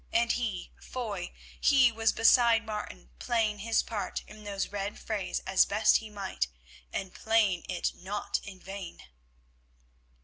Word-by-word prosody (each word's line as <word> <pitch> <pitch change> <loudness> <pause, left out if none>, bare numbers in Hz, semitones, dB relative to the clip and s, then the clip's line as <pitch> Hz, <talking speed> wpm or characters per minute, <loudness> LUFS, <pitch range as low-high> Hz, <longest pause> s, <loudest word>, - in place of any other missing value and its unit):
And 235 +1 +3
he, 220 -7 -2
Foy, 210 -8 -4 0.3
he 265 -4 +5
was 225 0 +2
beside 230 0 +5
Martin 65 - -6
playing 220 -3 0
his 225 +2 +2
part 215 -3 -4
in 215 0 -13
those 200 -1 -3
red 200 0 -3
frays 210 -4 -3
as 190 0 +4
best 215 +2 +4
he 220 - -8
might, 200 - -2 0.4
and 190 -1 -4
playing 215 -5 +2
it 180 -2 -1
not 200 +3 -3
in 190 -2 -10
vain. 190 -1 -8
210 Hz, 140 wpm, -30 LUFS, 195-225 Hz, 0.4 s, he